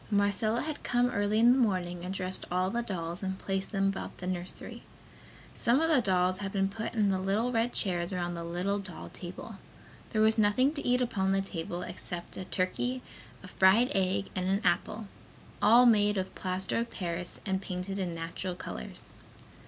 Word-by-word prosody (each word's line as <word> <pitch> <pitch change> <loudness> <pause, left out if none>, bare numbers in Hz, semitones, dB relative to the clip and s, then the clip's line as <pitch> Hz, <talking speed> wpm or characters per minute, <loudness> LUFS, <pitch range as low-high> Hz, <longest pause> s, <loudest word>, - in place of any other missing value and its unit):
Marcella 205 +2 +1
had 310 -1 -4
come 245 0 +2
early 205 0 +1
in 235 +2 +7
the 260 - +4
morning 180 -6 0
and 180 - -4
dressed 185 -1 -1
all 185 +1 +1
the 235 - 0
dolls 175 -6 -4
and 190 -1 -2
placed 195 0 -3
them 195 -2 +1
about 195 - -5
the 180 - -7
nursery. 180 -1 -4 0.7
Some 240 +3 +2
of 325 +1 +2
the 280 -5 +5
dolls 185 -2 +2
had 195 -1 -3
been 195 -1 +1
put 225 +3 -5
in 210 -3 +3
the 190 - 0
little 205 +6 0
red 230 0 +1
chairs 175 -3 -1
around 175 -1 -2
the 170 -1 -5
little 180 +4 -1
doll 190 -4 -8
table. 175 0 -8 0.5
There 215 -2 +2
was 220 +1 +5
nothing 235 +7 +4
to 290 - -3
eat 250 +1 +2
upon 195 -5 +1
the 195 - +2
table 175 -2 -4
except 175 -1 -5
a 185 - -5
turkey, 245 +8 -1 0.4
a - - -9
fried 195 +8 +4
egg 190 0 0
and 185 -1 -1
an 195 +2 +1
apple, 215 -1 0 0.5
all 235 +4 +7
made 210 -3 +4
of 190 0 -2
plaster 185 +3 -2
of 235 0 -2
paris 175 -1 -4
and 190 -1 0
painted 190 +1 -4
in 175 -3 -2
natural 170 +2 -4
colors. 65 - -7
195 Hz, 190 wpm, -30 LUFS, 185-220 Hz, 0.7 s, in